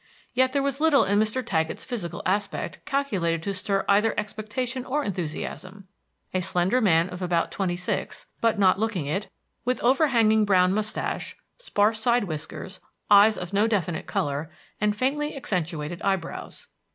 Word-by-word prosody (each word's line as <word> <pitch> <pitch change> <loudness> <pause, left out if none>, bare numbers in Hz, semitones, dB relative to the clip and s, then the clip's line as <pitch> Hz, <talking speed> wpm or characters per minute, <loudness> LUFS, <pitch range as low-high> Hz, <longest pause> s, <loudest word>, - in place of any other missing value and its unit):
Yet 260 +1 +3
there 275 +1 +1
was 275 +1 -1
little 315 -3 +5
in 200 +2 +2
Mr. 220 +4 0
Taggett's 160 -7 -1
physical 210 -9 -5
aspect 200 +2 -2
calculated 185 - 0
to 200 - -2
stir 195 +1 -1
either 210 +2 +3
expectation 225 +5 -4
or 290 +3 -1
enthusiasm: 185 - -5 0.5
a 185 - +1
slender 185 +6 +1
man 170 -5 +4
of 180 +1 -8
about 175 -2 0
twenty 185 -3 -1
six, 180 +1 -3 0.2
but 230 -1 +2
not 190 -1 +4
looking 210 -8 -1
it, 190 +9 -2 0.3
with 250 +1 0
overhanging 235 -5 +4
brown 185 -2 +4
mustache, 215 +1 -2 0.2
sparse 220 - +1
side 240 +1 +2
whiskers, 185 +2 -6 0.3
eyes 205 +1 +7
of 180 +2 -6
no 205 +3 +3
definite 180 -7 -1
color, 145 +2 -2 0.3
and 210 -1 +1
faintly 295 +6 -1
accentuated 175 - -3
eyebrows. 190 -4 -3
205 Hz, 150 wpm, -25 LUFS, 180-240 Hz, 0.5 s, eyes